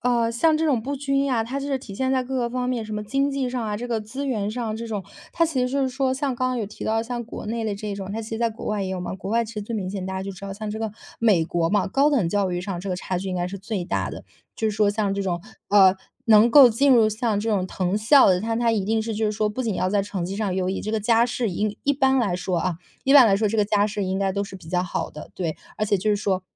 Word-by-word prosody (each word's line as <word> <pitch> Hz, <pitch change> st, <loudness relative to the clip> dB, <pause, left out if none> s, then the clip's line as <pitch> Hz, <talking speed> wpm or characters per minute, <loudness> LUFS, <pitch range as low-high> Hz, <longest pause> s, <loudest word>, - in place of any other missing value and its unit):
呃， 235 Hz, -2 st, +1 dB
像 310 Hz, +7 st, +3 dB
这 320 Hz, -, 0 dB
种 275 Hz, -7 st, +2 dB
不 280 Hz, +5 st, -4 dB
均 275 Hz, 0 st, 0 dB
呀， 240 Hz, -5 st, +1 dB
它 265 Hz, +5 st, -4 dB
是 275 Hz, -1 st, -1 dB
体 225 Hz, -7 st, -10 dB
现 260 Hz, +5 st, -1 dB
在 260 Hz, -1 st, +1 dB
各 265 Hz, +1 st, -5 dB
个 240 Hz, -2 st, 0 dB
方 250 Hz, +1 st, -2 dB
面， 245 Hz, -3 st, -1 dB
什 215 Hz, 0 st, -6 dB
么 210 Hz, 0 st, -4 dB
经 275 Hz, +6 st, 0 dB
济 270 Hz, -2 st, -2 dB
上 245 Hz, -2 st, -2 dB
啊， 210 Hz, -1 st, -2 dB
这 240 Hz, +3 st, -5 dB
个 230 Hz, -2 st, -1 dB
资 260 Hz, +7 st, -5 dB
源 210 Hz, -6 st, -1 dB
上 225 Hz, -1 st, -3 dB
这 230 Hz, +1 st, -6 dB
种。 205 Hz, -4 st, -3 dB, 0.3 s
它 335 Hz, -, +2 dB
其 315 Hz, -6 st, -1 dB
实 250 Hz, -, +1 dB
就 275 Hz, +1 st, +1 dB
是 260 Hz, -, 0 dB
说 260 Hz, 0 st, 0 dB
像 270 Hz, -1 st, -1 dB
刚 255 Hz, +1 st, 0 dB
刚 255 Hz, -, -1 dB
有 225 Hz, -, -1 dB
提 205 Hz, -, -8 dB
到 225 Hz, +1 st, +1 dB
像 240 Hz, +1 st, -4 dB
国 230 Hz, -, -8 dB
内 225 Hz, +1 st, -2 dB
的 210 Hz, -, -1 dB
这 205 Hz, 0 st, -5 dB
种， 195 Hz, -1 st, -6 dB
它 225 Hz, -, -3 dB
其 220 Hz, -, -9 dB
实 225 Hz, -, -3 dB
在 235 Hz, 0 st, +2 dB
国 225 Hz, 0 st, -9 dB
外 210 Hz, -1 st, -1 dB
也 190 Hz, -, -3 dB
有 190 Hz, -1 st, -3 dB
嘛， 180 Hz, -, -4 dB
国 195 Hz, +1 st, -6 dB
外 230 Hz, +1 st, +2 dB
其 225 Hz, -, -9 dB
实 215 Hz, -, -4 dB
最 220 Hz, +2 st, -4 dB
明 185 Hz, -3 st, -3 dB
显。 190 Hz, -2 st, -4 dB
大 190 Hz, -, -4 dB
家 190 Hz, -, -3 dB
就 195 Hz, 0 st, -5 dB
知 195 Hz, +1 st, -9 dB
道 195 Hz, -, -5 dB
像 215 Hz, +1 st, -5 dB
这 220 Hz, -, -4 dB
个 220 Hz, -1 st, -2 dB, 0.3 s
美 205 Hz, -8 st, +3 dB
国 165 Hz, 0 st, 0 dB
嘛， 205 Hz, +3 st, +1 dB
高 275 Hz, +9 st, +3 dB
等 240 Hz, -, +1 dB
教 200 Hz, -1 st, +1 dB
育 175 Hz, 0 st, -2 dB
上 190 Hz, -3 st, -4 dB
这 195 Hz, -, -6 dB
个 180 Hz, -, -1 dB
差 180 Hz, 0 st, -3 dB
距 195 Hz, -, -5 dB
应 185 Hz, -, -2 dB
该 175 Hz, 0 st, -1 dB
是 195 Hz, +2 st, -6 dB
最 195 Hz, -2 st, -4 dB
大 -, -, -1 dB
的。 -, -, -8 dB, 0.3 s
就 220 Hz, -, 0 dB
是 -, -, -6 dB
说 210 Hz, -1 st, +3 dB
像 205 Hz, -2 st, 0 dB
这 200 Hz, -, -2 dB
种， 175 Hz, -3 st, -2 dB, 0.3 s
呃， 195 Hz, -2 st, +6 dB, 0.3 s
能 220 Hz, +1 st, +6 dB
够 270 Hz, -1 st, +9 dB
进 275 Hz, +5 st, +3 dB
入 230 Hz, -3 st, +5 dB
像 215 Hz, -1 st, -1 dB
这 215 Hz, +2 st, -2 dB
种 200 Hz, -4 st, +1 dB
藤 185 Hz, +1 st, -1 dB
校 245 Hz, +6 st, +6 dB
的， 180 Hz, -1 st, +3 dB
但 225 Hz, +1 st, -1 dB
他 235 Hz, -1 st, +2 dB
一 205 Hz, -4 st, 0 dB
定 220 Hz, +2 st, +1 dB
是 220 Hz, 0 st, -3 dB
就 220 Hz, +1 st, -1 dB
是 210 Hz, -, +2 dB
说 215 Hz, 0 st, 0 dB
不 235 Hz, +5 st, -3 dB
仅 220 Hz, -4 st, -1 dB
要 185 Hz, -, 0 dB
在 200 Hz, +1 st, +1 dB
成 195 Hz, -3 st, -4 dB
绩 190 Hz, +3 st, -4 dB
上 210 Hz, -3 st, -1 dB
优 185 Hz, -1 st, 0 dB
异， 190 Hz, -, -2 dB
这 215 Hz, -, -4 dB
个 220 Hz, -, 0 dB
家 230 Hz, +2 st, +3 dB
世 240 Hz, -1 st, -1 dB
以 205 Hz, +3 st, -2 dB
一 285 Hz, -, +3 dB
般 270 Hz, -1 st, +2 dB
来 200 Hz, -7 st, +1 dB
说 180 Hz, 0 st, -1 dB
啊 180 Hz, +1 st, -1 dB, 0.3 s
一 270 Hz, -, +3 dB
般 275 Hz, -3 st, +10 dB
来 195 Hz, -2 st, +4 dB
说 215 Hz, +2 st, +1 dB
这 220 Hz, -, -1 dB
个 210 Hz, -, +3 dB
家 205 Hz, 0 st, +2 dB
世 205 Hz, -1 st, -3 dB
应 190 Hz, +1 st, -1 dB
该 195 Hz, -1 st, 0 dB
都 200 Hz, +1 st, -1 dB
是 195 Hz, -1 st, -7 dB
比 180 Hz, -3 st, -15 dB
较 180 Hz, 0 st, +1 dB
好 180 Hz, -, -3 dB
的， 150 Hz, -, -10 dB
对。 165 Hz, -4 st, -2 dB, 0.2 s
而 215 Hz, -, -1 dB
且 205 Hz, -, +2 dB
就 205 Hz, +3 st, 0 dB
是 205 Hz, -, +3 dB
说， 195 Hz, -2 st, -1 dB
215 Hz, 350 characters per minute, -24 LUFS, 195-245 Hz, 0.3 s, 般